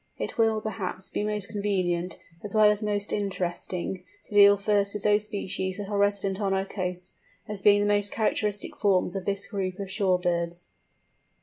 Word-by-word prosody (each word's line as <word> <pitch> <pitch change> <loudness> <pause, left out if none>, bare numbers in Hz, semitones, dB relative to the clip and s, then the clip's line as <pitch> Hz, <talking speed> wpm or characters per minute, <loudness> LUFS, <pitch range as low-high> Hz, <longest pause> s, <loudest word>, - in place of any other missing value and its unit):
It - - -4
will, 225 -2 +2
perhaps, 195 -3 -4
be - - -1
most 210 -1 +1
convenient, 185 -4 -1 0.3
as 210 0 -5
well 215 -1 +7
as 210 0 -2
most 205 -1 -1
interesting, 185 -2 -3 0.2
to - - -12
deal 205 0 +7
first 200 0 +1
with 210 - -4
those 210 0 +3
species 190 -3 -3
that 205 -1 -6
are 205 - -1
resident 200 -1 +1
on 195 -1 +1
our 190 0 0
coasts, 180 -2 -4 0.3
as 210 -2 -5
being 205 +1 +5
the - - +1
most 205 0 +2
characteristic 210 -2 -1
forms 190 -3 +1
of 190 -2 -4
this 200 0 -1
group 190 -3 -3
of 195 -1 -5
shore 190 -2 +2
birds. 175 -1 -2
200 Hz, 185 wpm, -27 LUFS, 185-210 Hz, 0.3 s, well